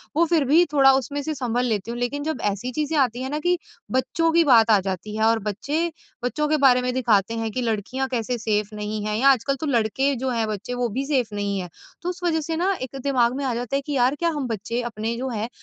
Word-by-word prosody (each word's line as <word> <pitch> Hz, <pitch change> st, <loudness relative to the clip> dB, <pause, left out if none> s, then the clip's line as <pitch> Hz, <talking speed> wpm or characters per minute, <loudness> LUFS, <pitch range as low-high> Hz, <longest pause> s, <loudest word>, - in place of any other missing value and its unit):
वो 335 Hz, -, +4 dB
फिर 325 Hz, -3 st, +2 dB
भी 310 Hz, +7 st, +5 dB
थोड़ा 270 Hz, -2 st, +6 dB
उसमें 285 Hz, +2 st, -2 dB
से 310 Hz, +2 st, -2 dB
सँभल 245 Hz, -1 st, -1 dB
लेती 220 Hz, -1 st, -2 dB
हूँ 240 Hz, -, -5 dB
लेकिन 285 Hz, +4 st, -2 dB
जब 310 Hz, -5 st, -3 dB
ऐसी 225 Hz, +6 st, -5 dB
चीज़ें 305 Hz, +3 st, -1 dB
आती 250 Hz, -3 st, +1 dB
हैं 260 Hz, -, -3 dB
ना 300 Hz, +2 st, -2 dB
कि 355 Hz, +2 st, +1 dB, 0.3 s
बच्चों 325 Hz, +6 st, +1 dB
की 335 Hz, 0 st, +5 dB
बात 235 Hz, -5 st, +5 dB
आ 210 Hz, -, +6 dB
जाती 190 Hz, +2 st, -4 dB
है 220 Hz, -, 0 dB
और 225 Hz, 0 st, +3 dB
बच्चे 300 Hz, -, -2 dB, 0.3 s
बच्चों 300 Hz, +5 st, 0 dB
के 310 Hz, -, +3 dB
बारे 250 Hz, -1 st, +6 dB
में 250 Hz, 0 st, -1 dB
दिखाते 225 Hz, -4 st, +2 dB
हैं 225 Hz, -1 st, -2 dB
कि 255 Hz, -, -2 dB
लड़कियाँ 235 Hz, +4 st, -2 dB
कैसे 240 Hz, 0 st, -1 dB
सेफ 210 Hz, -1 st, -1 dB
नहीं 210 Hz, 0 st, -4 dB
हैं 210 Hz, 0 st, -1 dB
या 275 Hz, +4 st, +5 dB
आजकल 275 Hz, +1 st, +2 dB
तो -, -, -1 dB
लड़के 260 Hz, +3 st, +1 dB
जो 265 Hz, -, 0 dB
हैं 230 Hz, -3 st, 0 dB
बच्चे 215 Hz, +3 st, -4 dB
वो 245 Hz, -1 st, -1 dB
भी 265 Hz, +6 st, -3 dB
सेफ़ 255 Hz, -7 st, 0 dB
नहीं 200 Hz, -1 st, -1 dB
हैं। 180 Hz, -, -5 dB, 0.3 s
तो 350 Hz, -, -3 dB
उस 360 Hz, 0 st, -6 dB
वजह 325 Hz, -2 st, +1 dB
से 320 Hz, +2 st, -3 dB
ना 375 Hz, +4 st, +1 dB
एक 260 Hz, +1 st, -6 dB
दिमाग 250 Hz, -3 st, +2 dB
में 280 Hz, -, -3 dB
आ 255 Hz, -, 0 dB
जाता 245 Hz, +2 st, -3 dB
है 275 Hz, -, +1 dB
कि 295 Hz, -, -3 dB
यार 260 Hz, +2 st, +2 dB
क्या 340 Hz, -, +2 dB
हम 270 Hz, -, -2 dB
बच्चे 230 Hz, +2 st, -3 dB
अपने 225 Hz, +2 st, -3 dB
जो 260 Hz, +1 st, -3 dB
हैं 225 Hz, -1 st, -3 dB
250 Hz, 260 wpm, -23 LUFS, 225-285 Hz, 0.3 s, थोड़ा